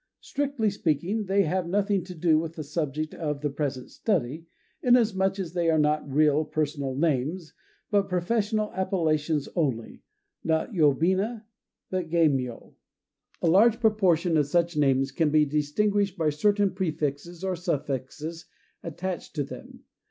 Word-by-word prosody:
Strictly 275 -7 -1
speaking, 185 +4 -1
they 195 +1 +3
have 180 +1 -1
nothing 200 +1 +1
to 180 -1 -9
do 160 -1 +3
with 165 0 -5
the 155 - -5
subject 155 0 -3
of 150 -3 -3
the 145 -1 -1
present 140 -3 -4
study, 160 - -2 0.3
inasmuch 210 -6 +3
as 180 -4 -4
they 170 -2 +1
are 160 - +3
not 150 -1 +1
real 150 +1 +3
personal 145 -3 -2
names, 155 +3 -1 0.4
but 200 -1 +2
professional 210 +4 0
appellations 160 -6 0
only, 135 -10 -2 0.4
not 160 +4 0
yobina, 185 - +2 0.5
but 185 -3 -2
geimyô. 140 -8 0 0.7
A - - +3
large 215 +7 +5
proportion 185 -7 +3
of 145 -2 +2
such 170 +2 +1
names 135 -2 +2
can 155 +3 +1
be 150 0 +4
distinguished 195 +7 0
by 160 -3 +1
certain 200 +5 +2
prefixes 165 -1 -3
or 190 -1 -1
suffixes 160 0 -4 0.3
attached 175 +3 -5
to 145 - 0
them. 135 - -11
165 Hz, 140 wpm, -26 LUFS, 150-190 Hz, 0.7 s, large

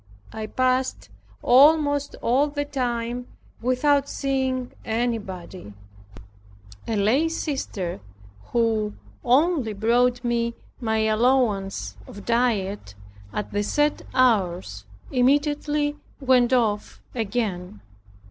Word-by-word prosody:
I 220 -1 -5
passed 255 +2 0 0.3
almost 285 +2 +4
all 265 +5 +3
the 290 0 -3
time 245 -3 -3 0.3
without 275 +3 +2
seeing 265 -2 -1
anybody. 200 - -4 1.1
A 225 - -1
lay 235 +11 +2
sister 265 - -3 0.5
who 220 -3 0 0.3
only 270 -2 +2
brought 240 +4 +2
me 235 -1 0 0.2
my 220 -3 0
allowance 215 - +1
of 205 - -11
diet 205 - 0 0.4
at 210 - -4
the 205 - 0
set 295 +8 +1
hours 185 - +1 0.3
immediately 290 +3 +1 0.2
went 255 -2 +3
off 220 -5 0
again. 200 - -3
240 Hz, 90 wpm, -24 LUFS, 210-270 Hz, 1.1 s, almost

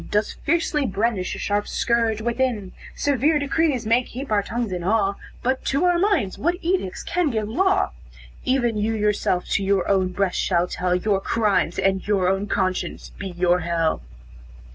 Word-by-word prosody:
Does 210 +1 0
fiercely 305 -3 0
brandish 200 -1 -1
a - - -7
sharp 205 0 -1
scourge 230 -2 +1
within; 235 -5 -1 0.2
Severe 285 +2 +2
decrees 285 -3 0
may 230 +3 +4
keep 255 +1 -8
our 210 -1 +3
tongues 230 +1 -3
in 180 -1 -3
awe, 200 +1 +2 0.3
But 260 +1 0
to 280 +6 +1
our 355 -1 +3
minds 355 - +1
what 345 +4 +1
edicts 340 - -1
can 350 -3 0
give 220 -4 -1
law? 380 - +2 0.5
Even 245 -4 +1
you 220 +2 0
yourself 210 -4 0
to 200 - +1
your 195 -2 +1
own 190 -2 +2
breast 185 0 -1
shall 175 -1 +1
tell 180 0 -1
Your 195 +1 +1
crimes, 205 -6 +1
and 190 0 0
your 195 -3 +2
own 195 +2 0
conscience 190 -2 -2
be 195 - -4
your 180 0 +1
hell." 165 - 0
210 Hz, 170 wpm, -23 LUFS, 190-260 Hz, 0.5 s, may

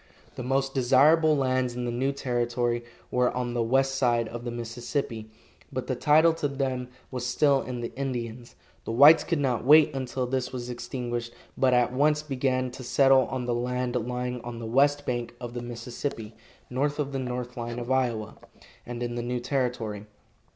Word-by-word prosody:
The - - -7
most 135 +2 0
desirable 145 +5 +4
lands 130 -2 0
in 125 0 -3
the 120 - -2
new 130 +3 0
territory 120 -2 -1 0.3
were 125 0 +3
on 125 -1 -2
the 120 - 0
west 135 +4 +2
side 120 -4 +1
of 120 0 -7
the - - -2
Mississippi, 120 -1 -4 0.4
but 130 -2 -3
the 130 - -2
title 155 +5 +5
to 145 - +2
them 135 -2 -2 0.2
was 125 -2 -4
still 135 +2 +3
in 125 -2 -5
the 120 - -6
Indians. 120 -3 -5 0.3
The - - -3
whites 145 +7 +8
could 170 - -1
not 130 -6 0
wait 150 +3 +6
until 130 -1 -2
this 125 0 -2
was 125 -1 -5
extinguished, 120 -1 -4 0.2
but 130 -2 +3
at 125 0 +2
once 150 +3 +2
began 130 -3 -1
to 130 - -9
settle 135 +1 +4
on 130 -2 -3
the 120 - 0
land 125 +1 -2
lying 125 0 -3
on 120 0 -7
the 115 - -6
west 145 +5 +2
bank 120 -1 -3
of 120 -1 -7
the 120 - -4
Mississippi, 120 -1 -5 0.3
north 145 +3 -1
of 145 -2 -2
the 135 - -2
north 125 -1 -4
line 120 0 -5
of 120 +1 -4
Iowa, 120 -5 0 0.5
and 120 0 -4
in 120 0 -3
the 120 - -3
new 125 +1 -2
territory. 120 -5 -2
125 Hz, 185 wpm, -27 LUFS, 120-135 Hz, 0.5 s, whites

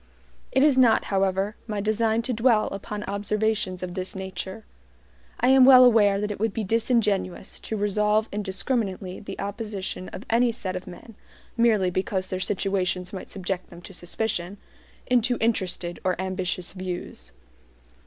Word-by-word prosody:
It 265 +2 +3
is 285 -3 +5
not, 235 -3 +5
however, 195 +2 +1
my 210 -2 -2
design 220 +2 +1
to 250 - -2
dwell 225 -1 +3
upon 205 +1 -6
observations 205 -2 -1
of 180 -1 -4
this 185 +1 -5
nature. 190 +2 -6 0.7
I 250 - +3
am 265 0 +7
well 255 -1 +9
aware 205 -5 +5
that 210 0 -2
it 205 - -6
would 220 -1 0
be 225 - -1
disingenuous 215 -3 0
to 220 - -4
resolve 210 +1 +1
indiscriminately 195 -1 -2
the - - -8
opposition 200 -2 -4
of 195 - -9
any 235 +1 +3
set 190 -5 -4
of 185 - -6
men 185 +5 -11 0.4
(merely 220 -6 +3
because 185 +1 -1
their 185 - -2
situations 185 -1 -1
might 190 - -7
subject 185 -1 -4
them 175 0 -13
to 195 - -10
suspicion) 180 +1 -3 0.5
into 245 -1 +2
interested 185 -6 -1
or 185 -2 0
ambitious 185 -1 -2
views. 180 - -6
200 Hz, 155 wpm, -25 LUFS, 185-225 Hz, 0.7 s, well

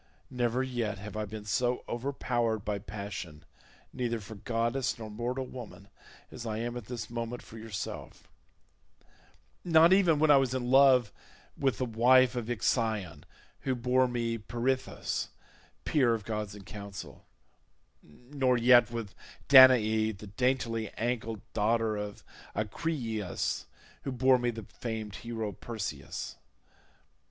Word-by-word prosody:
Never 125 0 0
yet 120 -5 -2
have 105 +1 -8
I 110 0 -2
been 105 0 -8
so 120 +4 0
overpowered 120 -4 -1
by 105 -1 -1
passion 100 -6 -7 0.5
neither 120 -3 -2
for 110 +1 -10
goddess 115 +4 -1
nor 110 -2 -7
mortal 125 +4 -3
woman 115 -6 -10 0.4
as 120 - -8
I 110 -2 -3
am 120 +1 -3
at 120 -3 -6
this 115 -1 -6
moment 120 +1 -4
for 115 - -11
yourself—not 160 - -2
even 180 -5 +4
when 155 0 +4
I 145 - +8
was 130 -1 +1
in 125 -1 -2
love 130 -4 +6 0.4
with 135 -5 0
the 130 - -1
wife 125 +2 +4
of 120 -1 -3
Ixion 110 - -1 0.3
who 130 -1 -1
bore 125 +1 +2
me 115 -2 -2
Pirithous, 120 +4 -2 0.6
peer 130 -6 +3
of 110 -3 -7
gods 105 -2 -4
in 100 - -11
counsel, 100 0 -9 0.8
nor 125 - -1
yet 120 +1 +6
with 115 -4 -5 0.4
Danae 110 -5 +7
the 105 +1 -11
daintily 115 0 -1
ancled 115 -2 -2
daughter 110 +1 +1
of 105 0 -6 0.3
Acrisius, 110 - -2 0.3
who 135 - -4
bore 130 0 +4
me 120 0 0
the 115 -2 -5
famed 110 -3 -6
hero 115 -3 -4
Perseus. 110 +1 -6
115 Hz, 130 wpm, -30 LUFS, 110-125 Hz, 0.8 s, I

